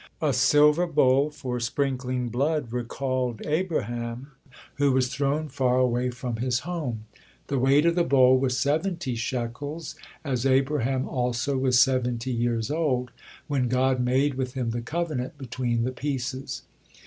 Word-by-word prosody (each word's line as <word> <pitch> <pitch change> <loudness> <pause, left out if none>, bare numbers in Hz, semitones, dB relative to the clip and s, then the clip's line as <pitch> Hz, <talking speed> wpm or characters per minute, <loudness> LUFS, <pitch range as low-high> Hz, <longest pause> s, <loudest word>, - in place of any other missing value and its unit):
A 150 -4 +1
silver 150 +6 +4
bowl 140 -2 +3
for 125 -4 -4
sprinkling 125 0 -1
blood 140 0 -1
recalled 125 -1 -2
Abraham, 130 - -2 0.5
who 140 -2 +3
was 130 -1 +1
thrown 145 +2 0
far 130 -3 +1
away 125 0 +2
form 125 -1 -4
his 125 +1 0
home. 145 -11 -4 0.4
The 140 -2 0
weight 135 +4 +4
of 170 - +4
the 175 0 +2
bowl 130 -4 +5
was 130 -1 0
seventy 155 -1 0
shekels, 130 +6 -4 0.3
as 130 -5 -1
Abraham 135 -1 +1
also 125 +2 -1
was 130 -2 +3
seventy 125 -1 +2
years 120 0 -1
old 130 -6 0 0.3
when 135 -4 0
God 130 +1 +2
made 130 +3 +2
with 130 -1 -4
him 125 -3 -1
the 120 +1 -3
covenant 150 -1 -3
between 125 -3 -2
the 125 - -1
pieces. 130 0 -4
130 Hz, 145 wpm, -26 LUFS, 125-145 Hz, 0.5 s, bowl